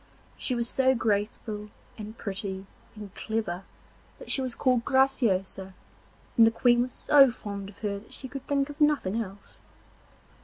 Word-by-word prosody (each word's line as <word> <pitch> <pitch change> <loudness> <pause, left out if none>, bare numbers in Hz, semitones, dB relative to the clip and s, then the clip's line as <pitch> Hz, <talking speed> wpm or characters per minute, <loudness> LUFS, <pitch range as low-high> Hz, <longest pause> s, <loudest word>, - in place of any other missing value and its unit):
She 255 - -2
was 235 -1 0
so 260 +1 +3
graceful 210 -1 -2 0.3
and 215 +1 -8
pretty 195 -2 -4 0.3
and 205 -2 -9
clever 200 -5 -3 0.5
that - - -7
she 270 - +2
was 255 -2 -3
called 250 -3 +2
Graciosa, 205 -9 +1 0.6
and 225 -1 +7
the - - +6
Queen 240 +1 +3
was 250 +1 -2
so 275 0 +6
fond 200 -4 -6
of 200 - -15
her 200 -1 -1
that 210 - -19
she 265 - -8
could 270 0 -8
think 280 0 0
of 290 - -12
nothing 275 -8 +2
else. 200 -1 -10
225 Hz, 160 wpm, -28 LUFS, 200-260 Hz, 0.6 s, and